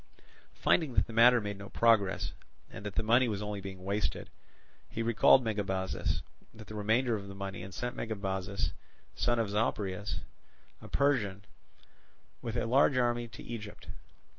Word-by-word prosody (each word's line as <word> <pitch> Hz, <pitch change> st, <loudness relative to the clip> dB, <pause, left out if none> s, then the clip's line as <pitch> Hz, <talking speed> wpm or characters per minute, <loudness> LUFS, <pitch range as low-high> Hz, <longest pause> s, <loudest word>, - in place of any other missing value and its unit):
Finding 150 Hz, -8 st, +2 dB
that -, -, +4 dB
the 115 Hz, -, -10 dB
matter 120 Hz, +2 st, +7 dB
made 100 Hz, -2 st, -5 dB
no 100 Hz, -, -8 dB
progress, 110 Hz, -5 st, +2 dB, 0.4 s
and -, -, -8 dB
that 105 Hz, -, -7 dB
the -, -, +1 dB
money 120 Hz, +3 st, +4 dB
was 105 Hz, -2 st, -2 dB
only 105 Hz, -1 st, -4 dB
being 95 Hz, -1 st, -8 dB
wasted, 100 Hz, +2 st, -2 dB, 0.6 s
he 115 Hz, -, -3 dB
recalled 115 Hz, +3 st, +6 dB
Megabazus 95 Hz, -4 st, -1 dB, 0.3 s
with 110 Hz, -1 st, -11 dB
the -, -, -7 dB
remainder 110 Hz, +4 st, +1 dB
of 100 Hz, -2 st, -6 dB
the 100 Hz, -, -8 dB
money, 95 Hz, -2 st, -5 dB
and 95 Hz, +2 st, -8 dB
sent 120 Hz, +5 st, -4 dB
Megabuzus, 100 Hz, -3 st, -2 dB, 0.4 s
son 120 Hz, 0 st, +1 dB
of 110 Hz, -3 st, 0 dB
Zopyrus, 105 Hz, -2 st, -1 dB, 0.6 s
a -, -, -10 dB
Persian, 105 Hz, -9 st, +1 dB, 1.0 s
with 115 Hz, 0 st, -3 dB
a -, -, 0 dB
large 130 Hz, +3 st, +4 dB
army 120 Hz, -1 st, +1 dB
to -, -, -11 dB
Egypt. 110 Hz, -3 st, -8 dB
105 Hz, 160 wpm, -31 LUFS, 100-120 Hz, 1.0 s, matter